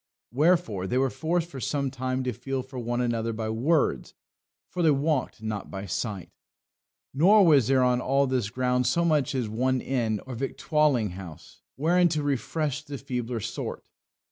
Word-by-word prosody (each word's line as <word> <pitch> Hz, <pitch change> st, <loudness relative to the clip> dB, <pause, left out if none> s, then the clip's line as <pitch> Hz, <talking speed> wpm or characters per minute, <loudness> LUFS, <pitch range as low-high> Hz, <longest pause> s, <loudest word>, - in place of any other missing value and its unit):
Wherefore 140 Hz, -, +2 dB
they 125 Hz, -, 0 dB
were 135 Hz, 0 st, +2 dB
forced 170 Hz, +1 st, -1 dB
for 140 Hz, -6 st, -8 dB
some 140 Hz, +1 st, -1 dB
time 130 Hz, 0 st, -2 dB
to 125 Hz, -1 st, -2 dB
feel 135 Hz, +3 st, -4 dB
for 130 Hz, 0 st, -8 dB
one 120 Hz, +1 st, -1 dB
another 115 Hz, -1 st, -1 dB
by 110 Hz, 0 st, -3 dB
words, 140 Hz, +8 st, 0 dB, 0.5 s
for 180 Hz, -, -4 dB
they 165 Hz, -, +4 dB
walked 140 Hz, -5 st, 0 dB
not 110 Hz, -2 st, -4 dB
by 95 Hz, +1 st, -6 dB
sight. 100 Hz, 0 st, -4 dB, 0.8 s
Nor 190 Hz, +8 st, +6 dB
was 145 Hz, -8 st, +5 dB
there 135 Hz, -1 st, +4 dB
on 125 Hz, 0 st, +2 dB
all 135 Hz, +2 st, +2 dB
this 130 Hz, -6 st, -1 dB
ground 125 Hz, +1 st, 0 dB
so 170 Hz, +7 st, +2 dB
much 150 Hz, -5 st, +1 dB
as 125 Hz, -4 st, -1 dB
one 130 Hz, +4 st, 0 dB
inn 115 Hz, -5 st, -1 dB
or 130 Hz, -, -7 dB
victualling 135 Hz, -, +1 dB
house 90 Hz, -4 st, -11 dB
wherein 175 Hz, +5 st, +3 dB
to 155 Hz, -3 st, -1 dB
refresh 145 Hz, +1 st, -1 dB
the 145 Hz, -2 st, -7 dB
feebler 125 Hz, -3 st, -4 dB
sort. -, -, -5 dB
130 Hz, 170 wpm, -26 LUFS, 115-150 Hz, 0.8 s, Nor